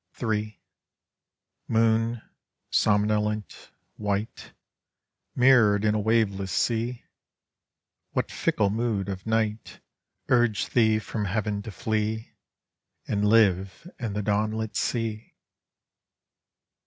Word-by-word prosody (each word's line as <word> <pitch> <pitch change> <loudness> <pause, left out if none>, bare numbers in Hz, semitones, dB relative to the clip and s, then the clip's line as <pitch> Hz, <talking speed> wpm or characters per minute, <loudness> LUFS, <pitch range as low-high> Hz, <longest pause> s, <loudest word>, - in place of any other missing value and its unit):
Ill 110 -3 0 1.2
Moon, 115 +1 +1 0.5
Somnolent, 105 0 0 0.3
white, 105 +1 -3 0.8
Mirrored 115 -5 +5
in 105 - +3
a 110 - 0
waveless 100 -3 +1
sea, 120 +1 -1 1.1
What - - -2
fickle 100 -2 +1
mood 110 -3 -1
of 95 +2 -6
night 110 -1 -1 0.5
Urged 120 -4 +1
thee 110 -3 +4
from 110 -1 -4
heaven 105 +1 -1
to 110 - -8
flee 110 +2 -2 0.8
And 105 -1 0
liv« 105 - +2
in 110 -4 -3
the 105 +1 -2
dawnlit 110 +1 -1
sea! 115 -2 -2
110 Hz, 95 wpm, -26 LUFS, 105-115 Hz, 1.2 s, Mirrored